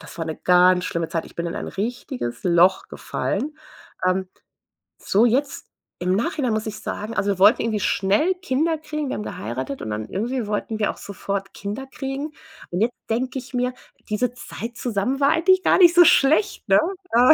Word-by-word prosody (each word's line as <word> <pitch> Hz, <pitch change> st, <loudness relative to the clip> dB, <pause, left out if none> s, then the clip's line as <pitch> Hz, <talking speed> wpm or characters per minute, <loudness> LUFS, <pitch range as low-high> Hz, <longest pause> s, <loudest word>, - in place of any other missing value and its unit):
das -, -, -12 dB
war 165 Hz, -, -2 dB
'ne 160 Hz, -, -4 dB
ganz 180 Hz, 0 st, +4 dB
schlimme 170 Hz, -1 st, -2 dB
Zeit. 165 Hz, -, -2 dB
Ich -, -, -15 dB
bin 170 Hz, 0 st, -3 dB
in 170 Hz, -, -4 dB
ein -, -, -4 dB
richtiges 125 Hz, -, -4 dB
Loch 180 Hz, +2 st, +4 dB
gefallen. 305 Hz, +2 st, -3 dB, 0.5 s
Ähm, 185 Hz, 0 st, +1 dB, 0.7 s
so 215 Hz, +5 st, +2 dB
jetzt 270 Hz, +4 st, 0 dB, 0.4 s
im 180 Hz, +1 st, +1 dB
Nachhinein 240 Hz, +3 st, 0 dB
muss 215 Hz, 0 st, -1 dB
ich 215 Hz, 0 st, -5 dB
sagen: 215 Hz, +1 st, -5 dB
Also, 200 Hz, -, +1 dB
wir 190 Hz, -, -3 dB
wollten 210 Hz, +5 st, +6 dB
irgendwie 220 Hz, -2 st, -1 dB
schnell 210 Hz, -, +2 dB
Kinder 320 Hz, +2 st, 0 dB
kriegen. 305 Hz, -2 st, -4 dB
Wir -, -, -2 dB
haben 210 Hz, -, -4 dB
geheiratet 130 Hz, +5 st, -5 dB
und 110 Hz, -, -5 dB
dann 105 Hz, +1 st, -4 dB
irgendwie 235 Hz, +3 st, -2 dB
wollten 215 Hz, +1 st, -3 dB
wir 210 Hz, -, +1 dB
auch -, -, -15 dB
sofort 195 Hz, 0 st, -5 dB
Kinder 210 Hz, +7 st, -6 dB
kriegen. 275 Hz, +2 st, -4 dB, 0.4 s
Und 175 Hz, -, -2 dB
jetzt 235 Hz, +3 st, +1 dB, 0.2 s
denk 250 Hz, +4 st, -1 dB
ich 260 Hz, 0 st, -6 dB
mir: 250 Hz, 0 st, 0 dB, 0.4 s
„Diese 240 Hz, +3 st, 0 dB
Zeit 235 Hz, -1 st, -8 dB
zusammen 240 Hz, +3 st, -1 dB
war 280 Hz, -, +4 dB
eigentlich 370 Hz, +4 st, +4 dB
gar -, -, +4 dB
nicht 350 Hz, -2 st, +7 dB
so 350 Hz, -1 st, +8 dB
schlecht“, 310 Hz, +11 st, +3 dB
ne? 195 Hz, 0 st, +6 dB, 0.3 s
Äh, 250 Hz, +6 st, +7 dB
220 Hz, 195 wpm, -23 LUFS, 190-265 Hz, 0.7 s, so